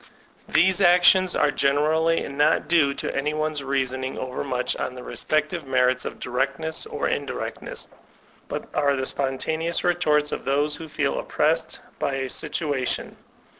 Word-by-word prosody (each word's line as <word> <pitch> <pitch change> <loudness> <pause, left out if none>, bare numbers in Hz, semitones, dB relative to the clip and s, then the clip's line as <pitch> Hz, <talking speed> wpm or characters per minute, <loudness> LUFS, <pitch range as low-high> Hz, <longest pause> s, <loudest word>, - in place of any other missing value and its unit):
These 185 +2 +3
actions 180 +1 +5
are 145 - +3
generally 155 +4 +2
not 145 +3 +2
due 150 -5 +3
to - - -3
any 150 +2 -1
one's 155 -2 -2
rea* 135 0 +1
soning 130 +1 -4
overmuch 130 0 -2
on 130 - -3
the 125 - -8
respective 155 +2 -1
merits 125 -1 +2
of - - -6
directness 135 +5 -1
or - - -2
indirectness, - - -4 0.6
but - - -5
are 140 -2 +2
the 130 -1 -2
spontaneous 155 +6 -1
retorts 155 -4 +2
of - - -4
those 145 +2 0
who 165 - -8
fed 155 -1 -2
oppressed 155 +3 0 0.2
by 140 - -1
a 135 -1 -3
situation. 145 -6 -2
145 Hz, 145 wpm, -24 LUFS, 135-160 Hz, 0.6 s, actions